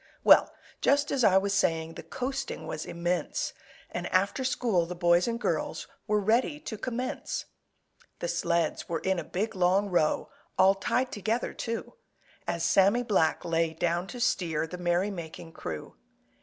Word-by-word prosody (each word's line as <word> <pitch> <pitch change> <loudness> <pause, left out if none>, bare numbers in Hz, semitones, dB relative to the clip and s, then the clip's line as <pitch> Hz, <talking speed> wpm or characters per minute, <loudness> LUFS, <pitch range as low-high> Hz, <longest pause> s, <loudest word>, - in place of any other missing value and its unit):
Well, - - +7 0.3
just 285 +1 +3
as 265 -3 +1
I 190 -3 +6
was 200 +1 +1
saying, 165 -4 +1
The - - -8
coasting 270 +1 -4
was 155 - -5
immense, 175 +1 -2 0.4
And - - -3
after 200 +8 +1
school 230 -9 +1
the 180 - -5
boys 175 +1 +3
and 235 0 -1
girls - - -2 0.2
Were 210 -1 +2
ready 235 +8 +1
to 220 - -5
commence. 250 +5 -3 0.7
The - - -3
sleds 170 - 0
were 170 - 0
in 190 +2 0
a - - -4
big, 205 +8 -2
long 190 +2 +2
row, 155 -3 +1 0.3
All 190 +1 +6
tied 250 +6 0
together, 220 +4 -1
too, 230 -1 -4 0.5
As 170 0 -1
Sammy 200 +7 +4
Black 190 -9 +1
lay 165 -1 +1
down 175 +2 0
to 245 - -7
steer 170 -10 +1
The 180 +2 -8
merry 175 +3 +1
making 165 -2 -8
crew. 80 - -7
190 Hz, 160 wpm, -29 LUFS, 170-230 Hz, 0.7 s, Well